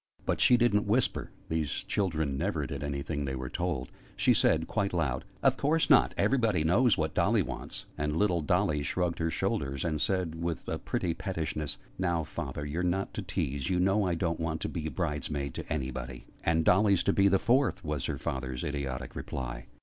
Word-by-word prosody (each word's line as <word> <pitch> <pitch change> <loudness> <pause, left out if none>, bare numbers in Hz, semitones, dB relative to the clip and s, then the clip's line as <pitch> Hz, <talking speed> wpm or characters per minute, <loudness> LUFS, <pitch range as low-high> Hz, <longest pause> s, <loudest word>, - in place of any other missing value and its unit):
But - - 0
she 125 -2 +6
didn't 105 -4 +3
whisper 115 +5 +1 0.2
(these 80 -3 -1
children 80 -8 0
never 65 - -1
did - - -5
anything 70 +1 -2
they 65 -1 -2
were 65 -1 -5
told): 85 -8 -2 0.2
she - - +4
said, - - +3
quite 100 -1 -1
loud, 70 -6 0 0.2
"Of - - +4
course 155 +3 +2
not! - - +6
Everybody 115 - +2
knows 105 +9 +4
what 80 -1 -1
Dotty - - +3
wants!" - - -6
And 75 +1 0
little 90 -4 +2
Dolly 75 0 +1
shrugged 85 +4 -1
her 80 0 +1
shoulders, 70 -2 -1
and 75 -3 -1
said, 90 -4 0
with 85 -1 -3
a - - -2
pretty 85 - -1
pettishness, 80 -5 -3 0.2
"Now, 85 -3 +1
Father, 75 -1 -5
you're 75 +4 -2
not 90 +2 0
to - - -3
tease! 70 -8 -2
You 90 - +2
know 95 +3 +3
I 90 -3 +1
don't 85 -1 -1
want 80 -1 -2
to - - -2
be 80 -3 -3
bride's 75 -5 -2
maid 70 -2 -3
to - - -7
anybody!" 65 -4 -4 0.2
"And 80 -1 +2
Dolly's 100 0 +4
to - - +2
be 100 0 +5
the 95 0 +4
fourth," 120 - +2
was 75 -3 -2
her - - -2
father's 65 -1 -3
idiotic 70 -3 -4
reply. - - -5
80 Hz, 195 wpm, -30 LUFS, 70-95 Hz, 0.2 s, she